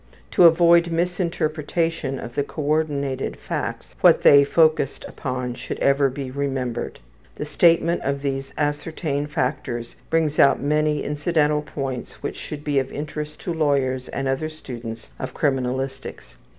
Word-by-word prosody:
To 180 - +6
avoid 170 +1 +6
misinterpretation 165 -3 -1
of 120 - -7
the 145 - 0
coordinated 145 -2 -1
facts, - - -4
what - - +6
they 140 -1 +8
are - - +2
focused 155 -3 +2
upon 125 -3 -4
should - - -6
ever 140 0 +3
be 130 0 -6
remembered. 130 -3 -3 0.4
The - - -4
statement 170 +2 +3
of 140 +1 -2
these 135 -1 -2
ascertained 150 0 -2
factors 120 -4 -2
brings 160 -2 +1
out 140 - +6
many 150 +1 +1
incidental 150 0 +1
points 135 -4 -6
which - - -4
should 150 -1 -7
be 145 -2 +1
of 135 0 -3
interest 150 0 -6
to 175 - -3
lawyers 140 -5 +1
and 135 -1 -3
other 135 +4 -1
students 120 -7 -8
of - - -5
criminalistics. 135 - -2
145 Hz, 140 wpm, -23 LUFS, 135-155 Hz, 0.4 s, they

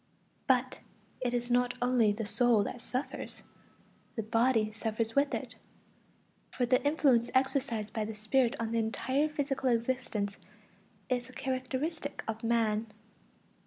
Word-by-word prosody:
But 255 -1 +2 0.4
it 250 -1 -1
is 245 0 0
not 245 0 +2
only 245 -3 +3
the 215 +2 -3
soul 235 -1 +3
that 240 +4 -5
suffers; 255 +3 -4 0.7
the 225 - -2
body 225 0 +2
suffers 225 +1 -2
with 280 0 +3
it. - - -6 0.9
For 250 - 0
the 250 +1 +3
influence 275 -5 +3
exercised 260 -5 +1
by 215 -1 -1
the 220 0 -5
spirit 230 +3 +2
on 225 -1 -2
the 230 - +1
entire 260 +6 0
physical 275 -3 -1
existence 230 -4 -1 0.7
is 245 -1 -1
a - - -13
characteristic 265 +4 -3
of 225 0 -4
man. 225 -1 +1
245 Hz, 135 wpm, -31 LUFS, 225-260 Hz, 0.9 s, only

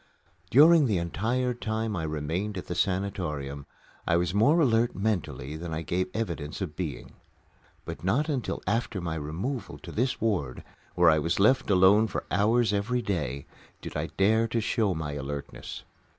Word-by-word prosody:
During 155 +2 +7
the 105 -5 +1
entire 115 +9 -1
time 110 -2 -2
I 85 - -2
remained 80 +7 -3
at 90 - -5
the - - -4
sanatorium 85 -8 -2 0.4
I 85 - +3
was 90 +1 0
more 120 +11 +4
alert 120 -5 +3
mentally 95 -8 -2
than 85 +1 -6
I 80 - -3
gave 90 +4 -1
evidence 85 -10 -3
of 90 -7 -4
being. 75 -8 -5 0.7
But - - -7
not 120 - +1
until 135 -7 -2
after 115 0 -1
my 85 -2 -3
removal 85 - -4
to - - -10
this 125 +3 -1
ward, 90 - -1 0.3
where - - +6
I 80 - +3
was 85 +4 -1
left 110 +6 +3
alone 100 +3 +5
for - - -4
hours 110 +3 +3
every 120 +5 0
day, 75 -9 -2 0.3
did - - -8
I - - -1
dare 110 +4 +3
to 115 +1 -1
show 110 -3 0
my 80 -2 -3
alertness. 70 0 -6
95 Hz, 165 wpm, -28 LUFS, 80-115 Hz, 0.7 s, During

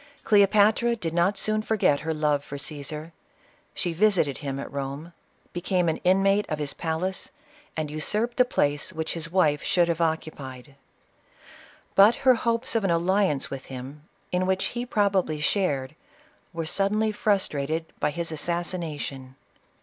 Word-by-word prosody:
Cleopatra 210 +3 +4
did 170 -8 -4
not 175 +4 +2
soon 215 +2 +2
forget 215 -10 +2
her 160 - -3
love 150 -2 +1
for 140 - -7
Ctesar. 150 +2 -5 0.6
She 175 -2 -2
visited 175 -7 +2
him 140 -2 -4
at - - -7
Rome, 140 +4 -5 0.4
became 180 0 0
an 160 - +1
inmate 195 +3 +2
of 155 - -1
his 150 -2 -2
palace, 175 +3 -3 0.5
and 155 -2 -2
usurped 210 +10 -1
the 250 - +7
place 145 - 0
which 160 -2 -3
his 165 -1 -6
wife 155 -6 +3
should 175 -2 +2
have 170 -1 0
occu 160 -1 -1
pied. 130 0 -10 1.2
But 205 +4 +7
her 260 - +8
hopes 235 +1 -1
of 225 -2 +1
an 195 - +1
alliance 170 -3 +1
with 135 -1 -6
him, 135 +4 -9 0.2
in 180 +1 0
which 190 0 +1
he 240 +1 -3
probably 195 -8 +1
shared, 150 -5 0 0.6
were 165 -2 -4
suddenly 210 +5 +1
frustrated 165 -7 0
by - - +1
his 165 +2 -3
assassination. 155 -5 -3
170 Hz, 150 wpm, -26 LUFS, 150-200 Hz, 1.2 s, her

